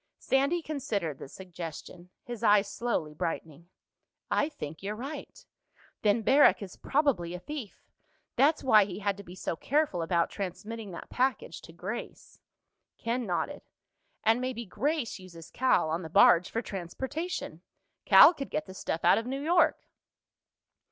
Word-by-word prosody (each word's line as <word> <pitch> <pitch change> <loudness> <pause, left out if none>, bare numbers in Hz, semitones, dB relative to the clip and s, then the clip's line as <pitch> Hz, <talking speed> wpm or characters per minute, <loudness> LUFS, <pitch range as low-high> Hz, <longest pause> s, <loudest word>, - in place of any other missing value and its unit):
Sandy 280 +6 +1
considered 205 - -3
the - - -8
suggestion, 175 +1 -9
his 240 -3 -7
eyes 205 -2 +4
slowly 200 -9 -2
brightening. 165 +1 -5 0.6
"I 295 - +2
think 155 - -8
you're 205 +2 -4
right. 270 +7 -8 0.6
Then 215 +1 +2
Barrack 260 -8 +5
is 190 - -9
probably 255 - 0
a - - -6
thief. 275 -2 -8 0.5
That's 290 +5 +3
why 215 -6 +6
he 190 -3 -7
had 200 -1 -1
to 200 - -9
be 180 -1 -11
so 175 - -3
careful 280 - 0
about 170 0 +1
transmitting 210 +3 -6
that 170 - -9
package 250 -9 -1
to - - -13
Grace." 190 +8 -7 0.6
Ken 235 0 -2
nodded. 180 - -2 0.6
"And 225 +3 +3
maybe 255 -2 -3
Grace 270 - -2
uses 170 -3 -12
Cal, 255 -11 +2
on 165 +3 -1
the 160 - -7
barge, 170 +2 +6
for 230 - -2
transportation. 265 - -5 0.4
Cal - - +9
could 275 -5 -6
get 305 - -2
the - - -10
stuff 165 -3 -3
out 175 - +6
of 225 - -6
New 270 +2 -3
York." 345 +3 +3
210 Hz, 150 wpm, -29 LUFS, 175-265 Hz, 0.6 s, Cal